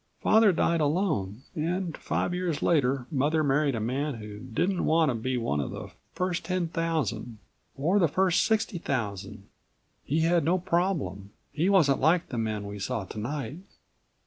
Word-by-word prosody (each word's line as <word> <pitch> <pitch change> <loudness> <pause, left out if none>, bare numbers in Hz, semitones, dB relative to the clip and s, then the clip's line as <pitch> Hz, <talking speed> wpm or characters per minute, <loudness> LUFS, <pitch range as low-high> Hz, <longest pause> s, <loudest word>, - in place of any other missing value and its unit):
Father 220 -1 +5
died 165 -1 +1
alone, 145 - 0
and 170 +1 -2
five 175 - -2
years 180 -4 -2
later 135 -5 +2
Mother 155 +2 +2
married 140 -1 +2
a - - -2
man 135 +6 -1
who 105 -2 -8
didn't 165 - -1
want 160 -1 +3
to - - +1
be 125 +3 -2
one 115 -11 -1
of 70 - -2
the - - -7 0.2
first 180 -1 -2
ten 180 0 -1
thousand 150 -10 -2 0.4
or 170 +9 +2
the 170 - +4
first 185 +3 +2
sixty 220 -5 0
thousand. 105 - -4 0.6
He 155 +4 0
had 170 +1 +3
no 170 +5 +2
problem. 170 - -1 0.2
He 165 +5 +1
wasn't 155 -9 +4
like 165 +4 +3
the 120 - -3
men 110 -2 -2
we 100 0 -6
saw 105 +1 -2
tonight." 135 - -5
150 Hz, 165 wpm, -28 LUFS, 120-175 Hz, 0.6 s, Father